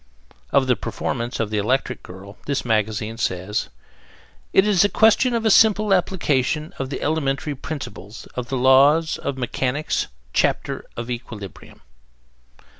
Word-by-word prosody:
Of 140 Hz, -1 st, +3 dB
the 125 Hz, -1 st, +3 dB
performance 115 Hz, +3 st, -4 dB
of 110 Hz, -2 st, -1 dB
the 105 Hz, -, 0 dB
Electric 125 Hz, +4 st, 0 dB
Girl 95 Hz, +2 st, -11 dB
this 140 Hz, -3 st, -1 dB
magazine 110 Hz, 0 st, -1 dB
says: 95 Hz, -, -2 dB, 0.8 s
It 190 Hz, -, +5 dB
is 200 Hz, -4 st, +4 dB
a 205 Hz, -, +3 dB
question 225 Hz, +4 st, +4 dB
of 230 Hz, -1 st, -1 dB
a 220 Hz, -, +4 dB
simple 215 Hz, -1 st, +5 dB
application 155 Hz, -3 st, 0 dB
of 135 Hz, -1 st, -3 dB
the 135 Hz, -, -4 dB
elementary 145 Hz, -1 st, -1 dB
principles 130 Hz, -7 st, -7 dB
of 125 Hz, +1 st, -5 dB
the 135 Hz, -, -1 dB
laws 140 Hz, +5 st, +4 dB
of 140 Hz, -1 st, -3 dB
mechanics, 130 Hz, +3 st, -1 dB, 0.3 s
chapter -, -, 0 dB
of 120 Hz, +1 st, -4 dB
equilibrium. 110 Hz, -5 st, -8 dB
130 Hz, 140 wpm, -22 LUFS, 115-160 Hz, 0.8 s, It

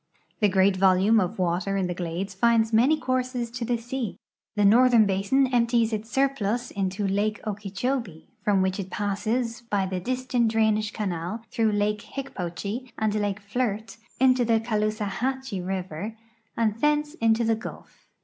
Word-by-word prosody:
The 210 Hz, -, +4 dB
great 190 Hz, 0 st, +3 dB
volume 195 Hz, +4 st, +4 dB
of 185 Hz, +2 st, -1 dB
water 185 Hz, +2 st, 0 dB
in 190 Hz, -, 0 dB
the 180 Hz, -, -2 dB
glades 175 Hz, +3 st, -4 dB
finds 225 Hz, +2 st, +2 dB
many 265 Hz, +8 st, +4 dB
courses 255 Hz, -2 st, -1 dB
to 245 Hz, 0 st, -4 dB
the 240 Hz, +1 st, 0 dB
sea. 240 Hz, -2 st, -4 dB, 0.4 s
The 205 Hz, -1 st, +3 dB
northern 235 Hz, +1 st, +6 dB
l)asin 200 Hz, +8 st, +2 dB
emi)ties 235 Hz, -2 st, +2 dB
its 215 Hz, +1 st, -3 dB
surplus 245 Hz, -3 st, 0 dB
into 195 Hz, +1 st, -2 dB
lake 205 Hz, +2 st, 0 dB
Okee 205 Hz, -1 st, -4 dB
chobee, 220 Hz, -, -3 dB, 0.2 s
from 200 Hz, -2 st, +3 dB
which 190 Hz, +1 st, -1 dB
it 190 Hz, -1 st, -4 dB
passes 220 Hz, +4 st, -2 dB
by 200 Hz, -2 st, +1 dB
the 185 Hz, -1 st, -3 dB
Disston 250 Hz, +1 st, 0 dB
drainage 220 Hz, -1 st, +1 dB
canal 190 Hz, +1 st, -3 dB
through 225 Hz, -3 st, +1 dB
lake 205 Hz, 0 st, 0 dB
IIicj)ochee 230 Hz, -1 st, -5 dB
and 215 Hz, -1 st, 0 dB
lake 205 Hz, -1 st, -1 dB
Flirt 220 Hz, +1 st, -3 dB, 0.2 s
into 255 Hz, -1 st, +4 dB
the 230 Hz, -1 st, +3 dB
Caloosahatchee 220 Hz, +2 st, -2 dB
river 190 Hz, +3 st, -4 dB, 0.4 s
and 220 Hz, -3 st, +1 dB
tlience 295 Hz, 0 st, +2 dB
into 225 Hz, +1 st, +3 dB
the 225 Hz, 0 st, +2 dB
Gulf. 220 Hz, -, -10 dB
215 Hz, 160 wpm, -26 LUFS, 195-240 Hz, 0.4 s, northern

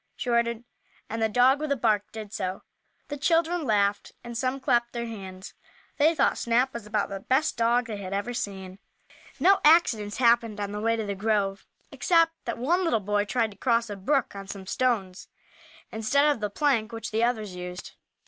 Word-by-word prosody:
she 245 Hz, -, -3 dB
ordered, 235 Hz, 0 st, +1 dB, 0.5 s
and 225 Hz, +1 st, -3 dB
the 220 Hz, -, +2 dB
dog, 250 Hz, +5 st, +4 dB
with 305 Hz, -1 st, -3 dB
a -, -, +3 dB
bark, 215 Hz, -5 st, 0 dB
did 215 Hz, -2 st, -8 dB
so. 185 Hz, -1 st, -4 dB, 0.5 s
The 290 Hz, -, -4 dB
children 330 Hz, +2 st, +1 dB
laughed 205 Hz, -3 st, +1 dB
and 235 Hz, 0 st, -8 dB
some 255 Hz, +2 st, -1 dB
clapped 240 Hz, -2 st, +1 dB
their 235 Hz, -1 st, -3 dB
hands. 190 Hz, -4 st, -8 dB, 0.5 s
They 315 Hz, +3 st, +4 dB
thought -, -, +2 dB
Snap 245 Hz, +3 st, +1 dB
was 235 Hz, -3 st, -7 dB
about 210 Hz, -1 st, -1 dB
the 195 Hz, -, -5 dB
best 265 Hz, +9 st, +1 dB
dog 235 Hz, +1 st, +2 dB
they 220 Hz, -3 st, -5 dB
had 190 Hz, -2 st, -7 dB
ever 200 Hz, +5 st, -2 dB
seen. 190 Hz, -4 st, -5 dB, 0.6 s
No 390 Hz, +2 st, +5 dB
accidents 235 Hz, -10 st, +4 dB
happened 235 Hz, -3 st, +3 dB
on 200 Hz, -1 st, -3 dB
the 210 Hz, 0 st, -4 dB
way 230 Hz, +1 st, +2 dB
to 220 Hz, -1 st, -3 dB
the 200 Hz, -, -2 dB
grove, 200 Hz, -1 st, -1 dB, 0.2 s
except 330 Hz, -2 st, +3 dB
that 235 Hz, -, -3 dB
one 335 Hz, +10 st, +1 dB
little 330 Hz, -10 st, +2 dB
boy 205 Hz, 0 st, 0 dB
tried 225 Hz, 0 st, 0 dB
to 200 Hz, -, -16 dB
cross 235 Hz, -1 st, +1 dB
a -, -, -4 dB
brook 240 Hz, +5 st, 0 dB
on 195 Hz, 0 st, -8 dB
some 195 Hz, -1 st, -8 dB
stones, 200 Hz, -4 st, -1 dB, 0.6 s
instead 225 Hz, +7 st, +2 dB
of 295 Hz, -5 st, +2 dB
the 210 Hz, -1 st, -2 dB
plank 235 Hz, -2 st, +1 dB
which 225 Hz, 0 st, -6 dB
the 220 Hz, +1 st, +1 dB
others 220 Hz, -5 st, -1 dB
used. 180 Hz, +1 st, -7 dB
230 Hz, 195 wpm, -26 LUFS, 205-255 Hz, 0.6 s, No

